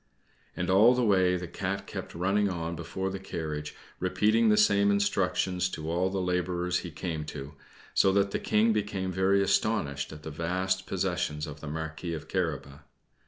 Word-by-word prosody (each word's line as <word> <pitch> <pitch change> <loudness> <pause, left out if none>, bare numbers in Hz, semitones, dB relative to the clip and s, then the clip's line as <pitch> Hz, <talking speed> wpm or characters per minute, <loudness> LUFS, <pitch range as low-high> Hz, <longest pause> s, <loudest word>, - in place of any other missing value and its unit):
And 90 +1 0
all 110 +6 +6
the 125 -1 +2
way 95 -3 +3
the 90 0 -5
Cat 95 +3 -3
kept - - -7
running 100 +4 +1
on 85 -2 -3
before 90 +3 -4
the 95 - -5
carriage, 75 -5 -5 0.2
repeating 105 +5 +3
the 105 - +4
same 100 -1 +4
instructions 95 -2 +1
to 80 -2 -5
all 90 +2 +1
the 95 0 -2
laborers 90 -1 0
he 85 - -6
came 80 0 -4
to; 70 -1 -7 0.4
so 95 - +4
that 100 0 +2
the - - -1
King 110 +1 +3
became 100 -3 -2
very 95 +2 +3
astonished 80 -10 0
at 75 -1 -10
the 80 - -6
vast 95 +4 -1
possessions 90 -5 -1
of 75 -1 -8
the 80 - -7
Marquis 80 +2 -4
of 75 - -8
Carabas. 75 -6 -2
90 Hz, 175 wpm, -29 LUFS, 80-100 Hz, 0.4 s, all